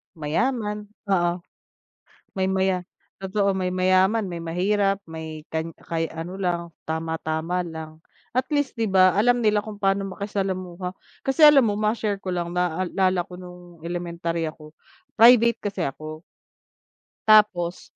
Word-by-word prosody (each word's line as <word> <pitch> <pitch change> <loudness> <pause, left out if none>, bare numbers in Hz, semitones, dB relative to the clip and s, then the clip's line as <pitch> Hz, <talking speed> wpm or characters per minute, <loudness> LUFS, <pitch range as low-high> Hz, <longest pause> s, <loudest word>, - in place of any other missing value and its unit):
Mayaman, 210 - -2 0.2
oo, 175 -2 +2 1.0
may 190 - +1
maya 190 -1 0 0.3
totoo 195 +1 0
may 185 -1 -1
mayaman, 185 +3 +2
may 170 - -5
mahirap, 195 +4 0
may 160 -1 -7
kan 160 0 -3
kay 165 -1 -3
ano 165 +4 -7
lang, 175 -2 0 0.3
tama-tama 160 +2 -2
lang, 160 -1 -8 0.4
at 260 - +2
least, 285 -4 0
'di 225 - +2
ba, 185 -1 +5
alam 245 +3 +3
nila 210 -1 +3
kung 210 -1 -9
pa'no 195 0 +1
makisalamuha 185 -3 -4 0.3
kasi, 270 +4 0
alam 285 -5 +8
mo, 205 - +1
ma-share 210 -1 -1
ko 185 - -4
lang, 175 -1 -3
naalala 180 +1 0
ko 180 - -13
no'ng 180 -2 -12
elementary 170 -1 -3
ako, 155 -1 -10 0.5
private 235 0 +7
kasi 200 -3 -4
ako. 155 +2 -6 1.1
Tapos, 195 -5 +3
185 Hz, 135 wpm, -24 LUFS, 170-205 Hz, 1.1 s, alam